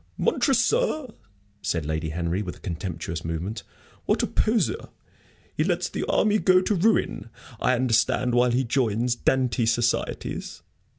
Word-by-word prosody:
"Montresor!" 305 - +1 0.5
said 80 -3 -1
Lady 80 +1 -2
Henry, 85 +4 -2
with 95 -4 -5
a - - -18
contemptuous 85 -2 -5
movement. 85 +7 -4 0.5
"What - - +2
a - - +4
poseur! 230 - 0 0.7
He - - +1
lets - - 0
the - - -3
army 215 0 +3
go 185 -2 +5
to 185 +3 0
ruin, 200 - +1 0.3
I 125 - +2
understand, 120 0 +1
while 125 +1 +4
he 125 +2 +1
joins 120 -1 +1
Dante 125 -1 +1
societies." 120 +1 -1
120 Hz, 135 wpm, -25 LUFS, -, 0.7 s, go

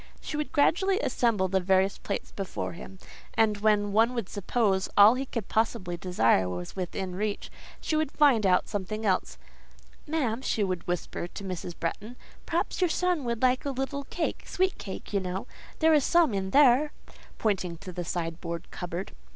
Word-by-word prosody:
She - - -6
would 300 0 -3
gradually 380 +7 +3
assemble 230 - +1
the 190 +1 +1
various 190 +1 +2
plates - - -4
before 195 -2 -4
him, 190 +2 -10 0.4
and, 220 -2 +3
when 205 -1 +2
one 225 +4 +3
would 230 -6 -3
suppose 200 -1 0
all 205 +2 +9
he 265 +2 -3
could 230 -6 -4
possibly 220 -5 0
desire 115 - +2
was 90 -1 -6
within 185 0 -3
his 180 - -6
reach, 210 -1 -3 0.3
she 315 - -2
would 310 -2 0
find 275 -8 +4
out 185 -2 +3
something 210 +2 -4
else: 190 -3 0 0.7
"Ma'am," 260 -7 -1
she 220 -5 0
would 185 -3 -3
whisper 175 0 -3
to 200 - -9
Mrs. 180 -2 -5
Bretton,—"perhaps 245 - -4
your 360 - +3
son 355 -4 0
would 235 0 -2
like 255 0 +3
a 285 - -2
little 275 +1 -3
cake—sweet 365 +4 -2
cake, 195 +1 -7
you 200 - +3
know—there 190 - -1
is 295 -3 +4
some 340 -7 +4
in 190 -1 -1
there" 280 +4 +5 0.4
(pointing 185 -5 -1
to 185 +2 -9
the 175 0 -4
sideboard 170 0 -4
cupboard). 175 +1 -5
210 Hz, 170 wpm, -28 LUFS, 185-265 Hz, 0.7 s, all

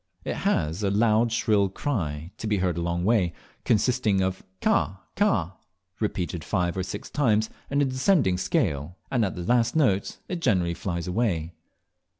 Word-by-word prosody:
It - - -2
has 80 +6 0
a 100 - +1
loud 110 +3 +3
shrill 105 -4 +2
cry, 85 - -3
to 110 - -4
be 105 -1 +1
heard 90 -3 0
a 85 - -2
long 85 +1 -1
way, 100 -6 +2 0.3
consisting 115 -2 +2
of 95 0 -1 0.2
"Cah, 95 0 +1 0.2
cah," 100 - +1 0.4
repeated 90 -6 -2
five 90 +2 0
or 95 - -1
six 90 0 -5
times 110 -6 +1 0.2
in 140 +1 +2
a - - +3
descending 130 - +2
scale, 90 - -1
and 125 -4 +2
at 95 - -1
the 90 - -5
last 120 - +2
note 105 -11 +2
it 180 -2 -4
generally 90 - +2
flies 85 -1 -4
away. 90 -5 -1
100 Hz, 165 wpm, -26 LUFS, 90-115 Hz, 0.4 s, loud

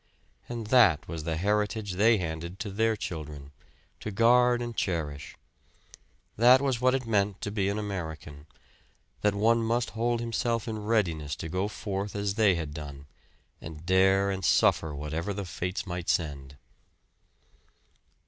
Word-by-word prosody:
And 120 -2 -4
that 105 - +5
was 80 -1 -6
the 80 -1 -1
heritage 105 +2 0
they 110 +5 +4
handed 85 0 -5
to 100 0 -5
their 110 +2 +1
children, 75 -7 -7 0.5
to - - -5
guard 120 +3 +4
and 120 -1 -5
cherish. 75 -7 -3 1.0
That 125 +4 +7
was 130 -3 -1
what 130 +1 +4
it 130 -2 -2
meant 100 -3 0
to 105 - -3
be 100 -2 0
an 100 - -2
American; 80 -7 -6 0.7
that 105 -1 +2
one 115 +3 +3
must 115 +1 0
hold 120 +1 0
himself 115 0 -1
in 110 -1 -3
readiness 90 -9 0
to 80 - -6
go 95 +4 -1
forth 100 -1 -4
as 100 -1 -1
they 105 -3 +4
had 80 -3 -4
done, 70 -2 -8 0.6
and 80 +1 -9
dare 95 +2 +3
and 95 -1 -4
suffer 80 -3 +3
whatever 80 +7 -3
the 100 -1 -4
fates 90 +2 -4
might 90 -2 -4
send. 70 -4 -2
100 Hz, 150 wpm, -28 LUFS, 80-110 Hz, 1.0 s, That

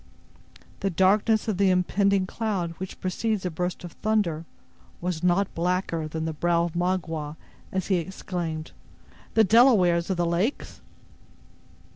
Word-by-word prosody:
The 195 - 0
darkness 205 +5 +3
of 210 -4 0
the 195 -1 +4
impending 190 +1 +2
cloud 195 -4 -2
which 190 0 -7
precedes 195 +2 -1
a 180 - -1
burst 180 +3 -3
of 175 - -7
thunder 185 -8 0 0.5
was 175 -2 -3
not 180 +2 +2
blacker 170 -2 -1
than 160 +1 -4
the 160 - -2
brow 170 +2 +1
of 170 -1 -3
Magua 165 -4 -2 0.3
as 190 -1 -1
he 190 - +2
exclaimed: 170 -3 -4 0.6
"The 220 - +6
Delawares 195 -6 +5
of 190 - 0
the 175 - +1
Lakes!" 175 +10 -2
180 Hz, 140 wpm, -26 LUFS, 170-195 Hz, 0.6 s, The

